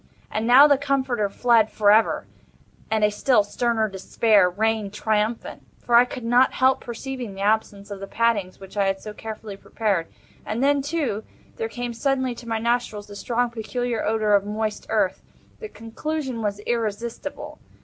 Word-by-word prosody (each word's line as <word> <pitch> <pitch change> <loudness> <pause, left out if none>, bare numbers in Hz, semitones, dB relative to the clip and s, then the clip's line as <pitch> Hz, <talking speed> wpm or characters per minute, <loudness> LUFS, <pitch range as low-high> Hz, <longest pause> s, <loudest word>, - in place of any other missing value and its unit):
And 220 +1 -2
now 260 +4 +9
the 285 -2 +4
Comforter 260 -7 0
fled 230 0 +3
for 205 -1 +3
ever, 220 +2 +3 0.6
and 220 -1 +1
a 210 - +4
still 210 +1 +3
sterner 220 +1 0
Despair 200 0 +2
reigned 210 +1 -1
triumphant; 220 +2 -1 0.2
for 240 - -5
I 240 +1 +8
could 250 0 -8
not 245 +3 +4
help 260 0 +3
perceiving 245 -2 -6
the 195 - -7
absence 205 -1 0
of 200 - -6
the 195 - -7
paddings 210 -5 0
which 195 0 -12
I 200 -1 +2
had 195 0 -1
so 210 +1 -8
carefully 215 -2 -8
prepared—and 215 +3 -3
then, 285 0 +3
too, 275 -8 -2 0.3
there 455 -1 -3
came 245 - -4
suddenly 260 +1 0
to 235 0 -12
my 225 - 0
nostrils 235 -2 -1
the 205 - -11
strong 240 +3 -1
peculiar 235 0 -3
odor 215 -1 +1
of 200 -1 +4
moist 210 +1 -3
earth. - - +1 0.4
The 435 - -7
conclusion 260 - -4
was 205 -1 -2
irresistible. 230 +4 -4
225 Hz, 170 wpm, -23 LUFS, 210-245 Hz, 0.6 s, now